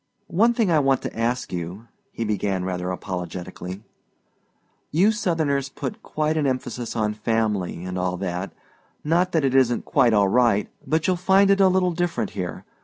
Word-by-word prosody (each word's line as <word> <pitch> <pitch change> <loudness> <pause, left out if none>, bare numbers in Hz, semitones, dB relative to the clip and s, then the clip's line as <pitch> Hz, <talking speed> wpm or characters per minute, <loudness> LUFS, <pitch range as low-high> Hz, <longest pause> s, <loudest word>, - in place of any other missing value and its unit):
"One 230 +7 +4
thing 220 -7 +2
I 160 - +4
want 135 -2 +2
to - - -5
ask 120 0 -1
you," 90 +6 -5 0.2
he 115 - -4
began 100 -3 -1
rather 90 -1 -3
apologetically; 90 +1 -6 1.1
"you 185 +8 +4
Southerners 160 -10 0
put 215 - -6
quite 155 +1 -1
an 150 -2 +1
emphasis 125 -2 -3
on 105 -2 0
family, 105 -5 -1
and 90 0 -3
all 90 0 -1
that 90 0 -3 0.5
not 175 +4 +2
that 160 -4 +2
it 130 - +1
isn't 130 -3 +3
quite 120 -2 +3
all 100 -1 +4
right, 115 -1 +3 0.2
but 160 0 +1
you'll 185 -1 +2
find 195 +2 +4
it 195 0 +4
a 190 - +7
little 185 -1 +2
different 175 0 -1
here. 90 -3 -5
120 Hz, 175 wpm, -23 LUFS, -, 1.1 s, a